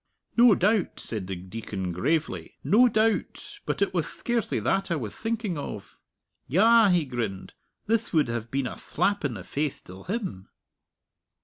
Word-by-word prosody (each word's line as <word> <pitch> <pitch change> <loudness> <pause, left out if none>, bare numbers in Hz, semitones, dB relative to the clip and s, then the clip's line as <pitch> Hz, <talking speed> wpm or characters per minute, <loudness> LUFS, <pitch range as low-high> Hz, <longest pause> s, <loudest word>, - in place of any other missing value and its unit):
"No 235 -3 +7
doubt," 205 +1 +1
said 105 -5 -4
the 95 - -3
Deacon 95 0 -5
gravely 150 - -1
"no 245 +5 +6
doubt. 220 0 0
But - - +1
it - - -2
wath - - 0
scarcely 235 -3 -1
that 195 0 0
I 170 - +1
wath 115 -9 -4
thinking 225 -7 -2
of. 105 -7 -7 0.5
Yah!" 220 - +6
he 175 -4 +3
grinned, 115 -7 -4 0.3
"thith 225 +1 0
would 155 -6 +3
have 120 -1 -3
been 135 +1 -1
a - - -3
thlap 200 -2 -1
in 135 -5 -1
the 95 - -7
face 145 +8 -2
till 95 +1 -12
him!" 185 - -4
155 Hz, 165 wpm, -27 LUFS, -, 0.5 s, No